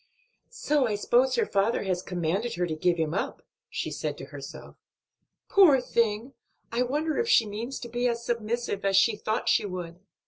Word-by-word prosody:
"So 295 - +1
I 210 - -1
suppose 245 +5 +2
her 455 - +2
father 200 - +1
has 185 -2 -1
commanded 185 +6 -2
her 175 0 0
to 160 -2 -3
give 175 +2 +1
him 160 -1 -1
up," 195 - -3 0.3
she - - -4
said - - -3
to - - -8
herself. - - -9 0.7
"Poor 345 -9 +6
thing! 235 +1 0 0.4
I 235 +1 0
wonder 300 +5 0
if 465 0 0
she 230 - +5
means 225 +6 -5
to 240 - -6
be 240 +1 -1
as 235 -1 -2
submissive 235 -2 -2
as 195 -1 +3
she 215 +2 +4
thought 215 +1 -2
she - - +3
would." 175 -2 -6
230 Hz, 185 wpm, -27 LUFS, 190-250 Hz, 0.7 s, Poor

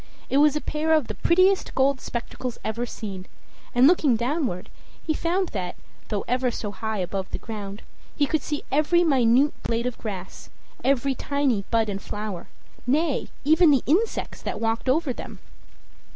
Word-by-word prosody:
It 270 - +3
was 295 0 +5
a 300 - 0
pair 315 +1 0
of 310 -4 +3
the - - -2
prettiest 370 +3 +3
gold 265 0 +2
spectacles 240 0 -5
ever 230 +3 -2
seen; 195 -5 -7 0.5
and 245 +1 +6
looking 295 -5 +5
downward, 240 - -2 0.3
he 315 - 0
found 350 +4 0
that, 180 -4 -4 0.3
though 205 -2 -2
ever 250 +1 +1
so 210 -3 -4
high 220 +1 -3
above 190 +1 -3
the - - -3
ground, 205 -2 -7 0.3
he 290 - +3
could 310 +1 0
see 295 +1 -3
every 310 +5 +3
minute 270 -2 +4
blade 230 +1 -1
of 250 -2 -3
grass, 190 -4 -7 0.3
every 275 0 +2
tiny 265 -7 0
bud 225 -1 +2
and 200 -1 -3
flower 210 -4 -5 0.4
nay, 295 +2 +1 0.2
even 315 +4 +5
the 275 -4 +4
insects 395 - 0
that - - -4
walked 225 +3 -1
over 280 -1 +2
them. - - -8
255 Hz, 165 wpm, -25 LUFS, 220-300 Hz, 0.5 s, and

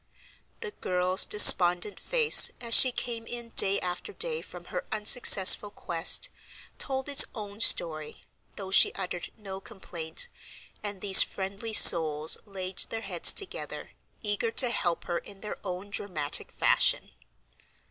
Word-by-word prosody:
The 450 -3 -8
girl's 185 - -1
despondent 180 -1 +4
face, 475 -3 +4
as 235 -1 -1
she 255 - +7
came 235 -2 -7
in 240 -1 -8
day 200 -3 +2
after 180 - -7
day 475 +2 -3
from - - -12
her - - -5
unsuccessful 210 -2 +3
quest, 170 -4 -1 0.5
told 265 -1 -3
its 285 0 +5
own 205 -2 -10
story, 155 -7 +1 0.3
though 190 -2 -10
she - - +4
uttered 180 -2 -7
no 195 -3 -10
complaint, 165 -4 -5 0.5
and 205 -2 -9
these 195 -2 +6
friendly 200 +3 -5
souls 155 -5 +4
laid 190 -2 -6
their 225 - -7
heads - - +2
together, 400 - -4 0.3
eager 210 +2 -2
to 245 +1 +1
help 175 -7 -4
her 175 -1 -5
in 195 -1 -16
their 210 - -8
own 190 +1 -9
dramatic 155 -9 -4
fashion. - - 0
200 Hz, 135 wpm, -26 LUFS, 180-230 Hz, 0.5 s, she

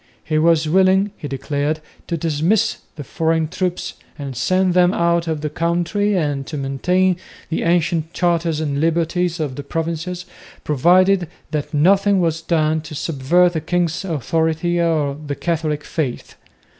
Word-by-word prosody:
He 155 -2 0
was 160 -1 +3
willing, 190 +4 +3
he 150 - -7
declared, 145 +3 -2 0.3
to 170 - -2
dismiss 165 +6 +1 0.2
the 150 - -7
foreign 160 +2 0
troops 180 +1 -3 0.2
and 140 -3 -6
send 185 +8 +2
them 180 +1 +4
out 170 0 +1
of 160 -2 -2
the 150 - -2
country 175 +6 0
and 145 -5 -1
to 150 - -5
maintain 180 +7 +1 0.3
the 160 - -1
ancient 170 -1 +1
charters 170 -3 0
and 145 -2 -1
liberties 170 +1 0
of 145 -5 -3
the 145 - -5
provinces, 165 +4 -3 0.4
provided 180 +5 +3 0.2
that 150 -2 -3
nothing 195 +6 +3
was 165 -2 0
done 160 -1 +1
to 155 0 -9
subvert 170 +5 +2
the 160 - -2
king's 170 +1 -1
authority 165 +1 0
or 155 -4 +1
the 145 -1 -4
Catholic 155 -3 -2
faith. 140 -7 -4
165 Hz, 150 wpm, -20 LUFS, 150-175 Hz, 0.4 s, them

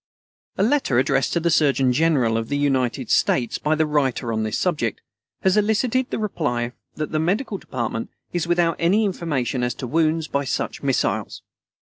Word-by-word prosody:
A 195 - +2
letter 235 - +2
addressed 135 +1 +2
to 170 - +2
the 170 0 +1
Surgeon 135 -5 +3
General 130 -6 +2
of 115 0 -2
the 145 - 0
United 130 -3 0
States 120 -3 +2
by 155 +1 +1
the 160 0 +2
writer 135 -6 0
on 110 - -1
this 110 -1 -1
subject, 150 - -1 0.4
has 190 +2 +3
elicited 225 +4 +1
the - - -2
reply 145 - -2 0.2
that 155 0 -4
the 155 - 0
Medical 200 - -1
Department 115 -3 -4 0.2
is 175 -1 -1
without 170 -1 +2
any 195 +6 +3
information 145 - -1
as 125 -1 -1
to - - -6
wounds 160 +3 +1
by 140 -1 -1
such 135 - -3
missiles. 135 -3 -1
150 Hz, 175 wpm, -22 LUFS, 125-175 Hz, 0.4 s, Surgeon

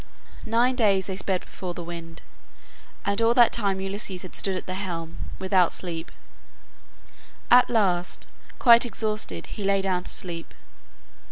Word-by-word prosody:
Nine 240 +3 +2
days 200 -6 +3
they 190 - -4
sped 185 -1 -1
before 180 -2 -7
the 175 - -6
wind, 165 -1 -8 0.8
and 200 +2 +1
all 230 +1 +3
that 240 -3 +6
time 200 -4 0
Ulysses 195 -1 -4
had 185 - -10
stood 195 -1 0
at 185 - -4
the 185 - -4
helm, 170 -4 -5
without 185 -2 +2
sleep. 170 -2 -5 1.4
At 250 +1 +7
last 185 -6 +1 0.3
quite 235 -2 +7
exhausted 220 -3 -2
he 210 - -7
lay 195 0 +2
down 180 -2 -1
to - - -5
sleep. 170 -2 -6
190 Hz, 150 wpm, -25 LUFS, 180-215 Hz, 1.4 s, At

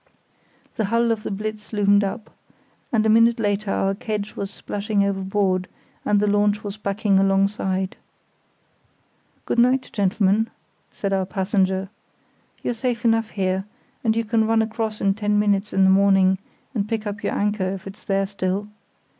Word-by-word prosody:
The 220 - +1
hull 230 +3 +2
of 225 -2 -1
the - - -5
Blitz 215 +1 -5
loomed 205 -1 +3
up, 200 +2 -4 0.6
and 220 -2 +2
a - - +4
minute 230 +2 +5
later 205 -1 0
our 195 0 +1
kedge 210 -1 -4
was 195 - -4
splashing 205 0 -2
overboard 195 -1 0 0.4
and 205 - +2
the 210 - +2
launch 205 +1 +2
was 205 -1 -5
backing 200 -1 +1
alongside. 195 -1 +1 1.5
"Good - - 0
night, 255 +2 +3
gentlemen," 205 +2 +2 0.4
said 200 -1 -3
our 190 -1 0
passenger. 190 -1 0 0.7
"You're - - 0
safe 240 0 -2
enough 225 -1 +2
here, 190 -1 -1 0.4
and 220 -2 +2
you 230 0 0
can 220 0 +2
run 225 0 +3
across 220 -1 -3
in 195 0 +3
ten 210 0 0
minutes 205 0 +1
in 195 - +3
the 190 - +6
morning 190 -1 +4 0.3
and 210 -4 -2
pick 225 -1 -2
up 205 0 -5
your - - -1
anchor, 205 -2 0
if 190 0 -6
it's 195 +1 -10
there 195 0 +1
still. 195 +1 -2
205 Hz, 165 wpm, -23 LUFS, 195-220 Hz, 1.5 s, the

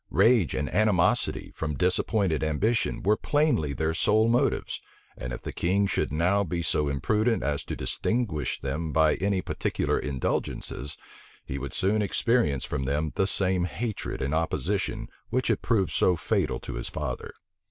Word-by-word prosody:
Rage 115 - +4
and 75 - -1
animosity, 105 -4 +2
from 75 -2 -3
disappointed 90 -2 +1
ambition, 100 +10 0
were 105 +2 +4
plainly 145 - +1
their 80 +3 -1
sole 110 +6 +3
motives; 125 +4 +1 0.3
and 60 - -6
if - - -6
the - - -5
king 95 +4 +1
should 100 - -1
now 90 +7 +2
be 85 -1 -2
so 75 -3 +1
imprudent 105 - +1
as 70 0 -1
to - - -4
distinguish 95 - -1
them 75 +4 -3
by 80 0 +4
any 95 -2 0
particular - - -1
indulgences, 70 0 -3 0.5
he 65 - -4
would 70 +1 -6
soon 100 +3 +2
experience 100 - +1
from 65 - -3
them 75 +3 0
the 95 - +1
same 95 -2 +2
hatred 100 - -4
and 70 +3 -1
opposition 80 +1 -1 0.2
which 130 0 0
had - - +1
proved 105 -6 +1
so 90 - +3
fatal 80 -8 0
to - - -6
his - - -5
father. - - -4
90 Hz, 160 wpm, -27 LUFS, 75-105 Hz, 0.5 s, Rage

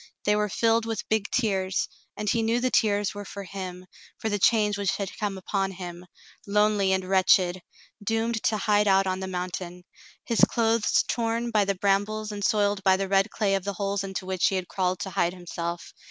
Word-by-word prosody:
They 210 - +3
were 210 0 0
filled 225 +2 +2
with 225 -1 -3
big 215 -1 0
tears, 190 -5 0 0.3
and 210 - -4
he 230 +3 +2
knew 225 +2 +1
the 255 +1 0
tears 205 -2 +2
were 205 0 -6
for 200 0 -8
him, 185 -1 -7 0.3
for 220 - -3
the 205 -1 -1
change 210 0 +3
which 200 -1 0
had 200 -2 -4
come 205 -2 -2
upon 195 +1 -1
him, 180 -1 -8 0.4
lonely 210 -1 +2
and 190 -1 +1
wretched, 185 -1 +3 0.4
doomed 225 +1 0
to 215 - +2
hide 210 0 +2
out 195 0 +4
on 185 0 -1
the 190 - -4
mountain, 180 -1 -5 0.4
his 230 - +1
clothes 225 -2 +3
torn 235 0 -1
by 210 -2 +3
the 200 0 0
brambles 205 +3 0
and 205 -1 -5
soiled 205 -1 +1
by 190 0 +5
the 195 0 -2
red 195 0 +3
clay 200 -3 0
of 195 -2 0
the 200 +1 -3
holes 200 +1 -2
into 190 -1 -5
which 185 -1 +1
he 195 - 0
had 185 -1 -2
crawled 185 -1 -1
to 190 - -4
hide 175 0 0
himself. 170 -1 -5
200 Hz, 205 wpm, -26 LUFS, 190-215 Hz, 0.4 s, by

